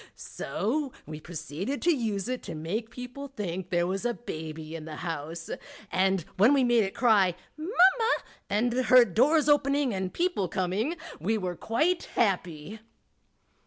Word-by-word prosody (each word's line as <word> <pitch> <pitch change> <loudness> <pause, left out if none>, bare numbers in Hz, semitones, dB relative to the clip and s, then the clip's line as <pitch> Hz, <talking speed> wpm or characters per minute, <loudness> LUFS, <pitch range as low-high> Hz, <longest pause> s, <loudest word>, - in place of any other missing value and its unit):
So 270 +6 -3
we 155 - -7
proceeded 175 - -5
to 345 -2 +4
use 220 -5 -2
it 255 0 -2
to - - -4
make 195 +9 -3
people 250 +4 -7
think 190 -8 -5
there 175 -1 +2
was 190 +3 -2
a 240 -1 0
baby 160 -5 -7
in 155 -2 -7
the 155 -1 -7
house, 165 0 -5 0.4
and 190 0 +2 0.2
when 220 +9 +6
we 270 - +3
made 240 -2 +4
it 195 - -4
cry 205 -7 +4 0.2
"Mam 310 +2 -6
ma," 405 +5 +4 0.3
and 230 +4 +1
heard 250 -5 +5
doors 295 - +4
opening 285 -3 +3
and 190 -1 -2
people 345 - 0
coming, 190 - -1 0.2
we 215 +8 0
were 180 -3 -3
quite 315 - 0
happy. 185 -2 -1
215 Hz, 160 wpm, -28 LUFS, 175-260 Hz, 0.4 s, when